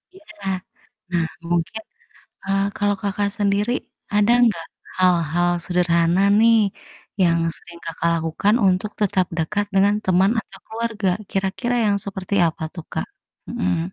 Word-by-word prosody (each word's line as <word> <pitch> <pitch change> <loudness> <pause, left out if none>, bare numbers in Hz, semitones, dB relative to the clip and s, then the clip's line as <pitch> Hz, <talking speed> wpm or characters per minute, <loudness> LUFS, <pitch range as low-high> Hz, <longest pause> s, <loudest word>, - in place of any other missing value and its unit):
Iya. 380 - -16 0.9
Nah, 170 -2 +1 0.2
mungkin, 175 +5 -1 0.6
eee, 195 0 +1
kalau 205 -1 +1
Kakak 200 0 -1
sendiri, 205 +2 +1 0.4
ada 210 +2 +4
enggak 230 -4 +2 0.3
hal-hal 175 -2 +2 0.2
sederhana 175 0 +2 0.2
nih, 230 0 +6 0.6
yang 170 -2 +4 0.2
sering 170 -1 -13
Kakak 165 +1 -1
lakukan 165 +6 +1
untuk 190 +3 +1
tetap 190 -2 +2
dekat 205 +6 0
dengan 200 +2 +4
teman, 190 +2 +4
atau 195 -1 -16
keluarga? 220 -3 -2 0.2
Kira-kira 195 +6 -1
yang 200 -1 +2
seperti 195 0 -4
apa 160 0 -5
tuh, 170 - -7
Kak? - - -2 0.4
Mhm. 185 -7 0
195 Hz, 130 wpm, -22 LUFS, 175-205 Hz, 0.9 s, nih